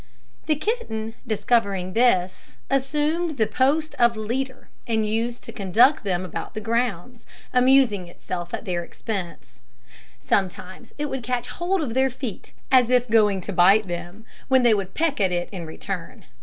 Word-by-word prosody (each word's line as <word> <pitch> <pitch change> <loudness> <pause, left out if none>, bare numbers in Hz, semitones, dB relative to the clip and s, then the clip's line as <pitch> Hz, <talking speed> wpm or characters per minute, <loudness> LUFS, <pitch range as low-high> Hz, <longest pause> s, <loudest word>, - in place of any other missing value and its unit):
The 310 - +3
kitten, 280 - -3
discovering 200 -4 0
this, 190 -6 +1 0.2
assumed 300 +4 0
the 220 - +3
post 275 +8 +1
of 235 -2 +4
leader, 255 +5 -4 0.2
and 220 -2 +1
used 230 +3 -2
to - - -8
conduct 225 +8 +3
them 185 -2 -1
about 180 - -6
the - - -2
grounds, 230 0 -2 0.3
amusing 250 -7 +4
itself 175 0 -6
at - - -5
their 175 -3 -2
expense. 170 - -7 0.6
Sometimes 190 +3 -2
it 295 - -2
would 265 -3 -4
catch 245 0 -2
hold 350 0 -1
of 240 -6 -3
their 265 +1 +3
feet, 250 -4 -7 0.2
as 255 -3 +5
if 250 -2 +2
going 210 -4 +4
to 200 - -5
bite 195 +4 +5
them, 175 +5 -7 0.2
when 260 -1 +4
they 235 -2 +6
would 195 -2 -2
peck 315 -8 0
at 190 -2 +2
it 175 0 -2
in 175 -5 -6
return. 160 - -6
225 Hz, 160 wpm, -24 LUFS, 190-260 Hz, 0.6 s, they